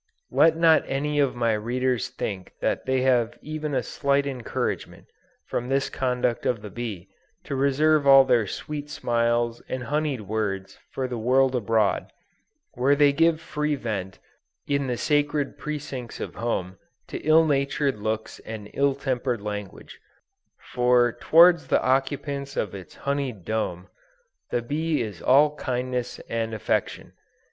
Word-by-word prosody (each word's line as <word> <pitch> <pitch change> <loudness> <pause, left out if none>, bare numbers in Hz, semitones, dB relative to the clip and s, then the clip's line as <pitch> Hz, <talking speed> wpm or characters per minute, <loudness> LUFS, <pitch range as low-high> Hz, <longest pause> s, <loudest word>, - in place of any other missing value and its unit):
Let 160 0 +4
not 165 -1 +5
any 145 +2 -1
of 140 -3 +2
my 115 -2 +1
readers 125 +3 -1
think 100 -7 -5
that - - -1
they 130 0 +2
have 125 -3 +2
even 155 -1 -4
a - - +1
slight 140 -1 0
encouragement, 130 -4 -4 0.4
from 120 +1 -3
this 135 +1 0
conduct 125 -2 -1
of 115 -4 -1
the 105 - -8
bee, 100 -5 -6 0.3
to 140 - -4
reserve 140 +2 +3
all 135 0 +9
their 115 -5 +2
sweet 150 +7 -6
smiles 120 -3 0
and 130 -1 -3
honied 145 -1 -1
words 100 -2 -3
for 130 -1 -3
the 125 -2 -4
world 130 +3 +3
abroad, 110 -3 +1 0.6
while 135 +4 +3
they 145 -1 +4
give 165 +1 +3
free 150 -2 -2
vent, 100 -7 -4 0.5
in 140 -1 0
the 125 -1 -1
sacred 145 0 0
precincts 140 -5 -6
of - - -5
home, 95 -6 -3 0.3
to - - -5
ill 160 +1 +5
natured 140 -3 0
looks 110 +1 -3
and 105 -2 -8
ill 140 -1 +2
tempered 125 -4 -2
language; 105 -2 -7 0.7
for 125 -1 +4
towards 165 +3 +5
the - - +2
occupants 140 +1 -1
of 105 - -1
its 95 -5 -10
honied 140 -9 -3
dome, 95 -5 -2 0.6
the 120 - -1
bee 155 +2 -1
is 105 -5 -7
all 145 +3 +4
kindness 125 -1 -3
and 115 -1 -2
affection. 110 - -2
130 Hz, 145 wpm, -25 LUFS, 115-140 Hz, 0.7 s, all